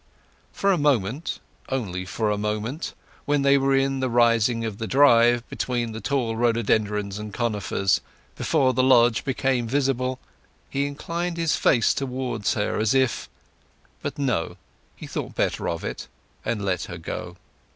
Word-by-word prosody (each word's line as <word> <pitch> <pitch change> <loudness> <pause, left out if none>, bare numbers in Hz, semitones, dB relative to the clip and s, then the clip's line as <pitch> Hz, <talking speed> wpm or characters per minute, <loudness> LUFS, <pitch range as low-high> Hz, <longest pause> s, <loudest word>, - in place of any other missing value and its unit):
For 200 - +1
a 180 - +2
moment—only 125 - -2
for 105 +3 -1
a 105 - 0
moment—when 125 +6 -3
they 140 0 +5
were 135 0 +2
in 135 0 +1
the 130 -1 0
turning 115 -1 +3
of 105 -2 -5
the 110 - -3
drive, 120 -3 +5
between 120 -2 -2
the 110 +1 -6
tall 125 -6 -1
rhododendrons 105 -3 0
and 105 0 -6
conifers, 105 -3 0 0.3
before 130 -1 +2
the 130 - +2
lodge 120 -3 +4
became 130 -3 0
visible, 130 -1 0 0.5
he 140 +1 0
inclined 170 +4 -4
his 165 -2 +1
face 120 -5 +3
towards 130 -5 -2
her 105 0 -1
as 110 +4 +2
if—but, 130 -2 -4
no: 125 -12 -1 0.4
he - - -9
thought - - -5
better - - 0
of 85 - -3
it, - - -5 0.4
and 105 -3 -2
let 90 -3 -1
her 85 - -7
go. 90 +1 -6
120 Hz, 145 wpm, -24 LUFS, 105-135 Hz, 0.5 s, they